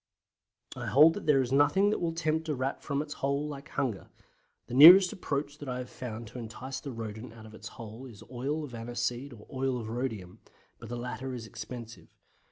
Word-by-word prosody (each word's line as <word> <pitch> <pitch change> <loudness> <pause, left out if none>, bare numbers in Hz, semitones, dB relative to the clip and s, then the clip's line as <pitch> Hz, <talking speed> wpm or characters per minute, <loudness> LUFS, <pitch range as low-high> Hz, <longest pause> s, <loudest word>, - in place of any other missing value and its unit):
I - - -5
hold 155 +4 +7
that 205 - -7
there 140 -3 +5
is 125 - -5
nothing 145 +9 +4
that - - 0
will 170 -1 0
tempt 160 -1 -1
a 150 - 0
Rat 130 +1 -2
from 140 0 -1
its 145 -1 -7
hole 140 +2 0
like 145 +1 -8
hunger. 125 -8 -2 0.6
The - - -9
nearest 175 +7 +10
approach 145 -4 -3
that 145 - -7
I 125 - -2
have 125 0 -6
found 115 -2 -6
to 125 - -8
entice 120 +3 -6
the 140 - -7
Rodent 110 0 -7
out 110 -1 -12
of 110 - -13
its 110 0 -9
hole 115 +3 -9
is 110 -5 -12
oil 140 +5 -2
of 140 -4 -8
aniseed 120 +3 -3
or 105 -4 -13
oil 130 -1 -1
of 110 -2 -6
rhodium, 110 -5 -4 0.4
but - - -10
the 120 - -4
latter 125 +2 -5
is 115 -2 -7
expensive. 115 +1 -9
130 Hz, 210 wpm, -30 LUFS, 115-145 Hz, 0.6 s, nearest